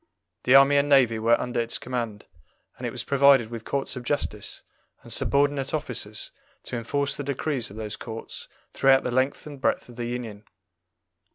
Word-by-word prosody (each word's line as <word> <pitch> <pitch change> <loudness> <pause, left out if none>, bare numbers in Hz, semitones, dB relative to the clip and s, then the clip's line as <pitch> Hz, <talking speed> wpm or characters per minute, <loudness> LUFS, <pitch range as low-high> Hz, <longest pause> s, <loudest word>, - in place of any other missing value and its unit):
The 125 - +6
army 140 +1 +7
and 140 +1 +2
navy 125 -6 +4
were 115 +1 +3
under 125 -1 -2
its 115 0 -1
command, 120 -4 -4 0.5
and - - -3
it - - -4
was - - -4
provided 140 -4 +4
with 115 -1 -7
courts 140 0 -2
of 125 - -6
justice, 120 -6 -3 0.4
and - - -7
subordinate 140 0 +1
officers 115 -7 -5 0.3
to - - -5
enforce 140 +4 -1
the 145 - -5
decrees 140 -2 -2
of 100 - -12
those 110 -1 -5
courts 115 -1 -8 0.3
throughout 135 0 +4
the 125 - -2
length 130 +3 0
and 145 -3 -10
breadth - - 0
of 120 - -13
the 120 - -3
Union. 115 -4 -5
125 Hz, 180 wpm, -25 LUFS, 115-140 Hz, 0.5 s, army